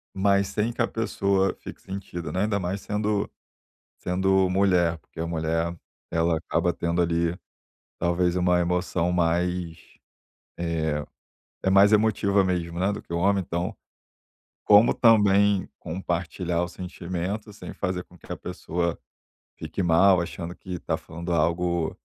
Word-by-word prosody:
mas 100 0 +3
sem 110 +4 -1
que - - -2
a 120 - +3
pessoa 100 -4 0
fique - - -9
sentida, 95 -3 -6
né. 95 - -1
Ainda 105 -1 +1
mais 95 +2 -3
sendo 105 0 -1 0.7
sendo 95 +1 +2
mulher, 90 -3 +2
porque 80 - -16
a 85 - -1
mulher 80 +1 -1 0.4
ela 80 0 +2
acaba 85 +1 0
tendo 85 +1 0
ali, 85 0 0 0.6
talvez, 90 0 +1
uma 90 -1 +3
emoção 90 0 0
mais, 85 -1 0 0.8
eh, 80 -3 -1 0.6
é 95 - +2
mais 100 +2 +6
emotiva 105 -2 +3
mesmo, 85 -2 -2
né, 95 +3 +1
do - - -5
que - - -11
o 85 - 0
homem. 100 +1 +2
Então, 85 +1 -2 0.9
como 105 +3 +6
também 100 -4 +4
compartilhar 85 0 -2
os 90 - -8
sentimentos, 90 +4 -5
sem - - -8
fazer 90 -1 -3
com 90 - -19
que - - -18
a - - -4
pessoa 85 0 -3 0.6
fique 80 +5 -4
mal, 90 +2 +5
achando 85 0 -5
que 90 -2 -7
tá - - -1
falando 85 +2 -6
algo 85 +1 0
90 Hz, 145 wpm, -25 LUFS, 85-100 Hz, 0.9 s, mais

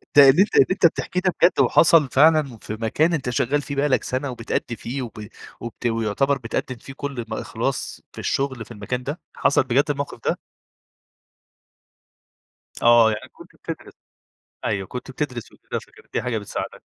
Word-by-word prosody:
ده 140 -1 +10
اللي 145 +8 +6
أنت 205 - +1
اللي - - +7
أنت 185 - +2
بتحكيه 180 +2 +1
ده 185 -1 +1
بجد 175 - +5
وحصل 160 -4 +5
فعلًا 150 -4 +4
في 110 - -7
مكان 115 +10 +1
أنت 135 -6 -1
شغّال 130 +4 +1
فيه 140 0 -6
بقى 140 +2 +2
لك 130 -3 +2
سنة 130 +2 -2
وبتأدي 115 0 -3
فيه 130 +4 -5
وب 110 -3 -7 0.3
وبت 120 +1 -8
ويُعتبر 115 +5 +1
بتقدم 125 +1 -3
فيه 135 +3 -11
كل 135 -4 -5
م - - -4
إخلاص - - -3
في - - -9
الشغل 130 -4 -1
في - - -15
المكان 120 +3 -4
ده، 145 +6 -4 0.2
حصل 140 - +3
بجد 130 +2 +3
الموقف 140 0 -4
ده؟ - - 0 2.4
آه، 120 -1 +6
يعني 105 - -5
كنت - - -15
بتدرس، - - -8 0.7
أيوه، 95 -2 -1
كنت 125 +4 -7
بتدرس 125 -4 -4
وكده - - -6
فكانت - - -20
دي - - 0
حاجة 120 -2 -2
بتساعدك. 105 -2 -5
130 Hz, 175 wpm, -23 LUFS, 115-145 Hz, 2.4 s, ده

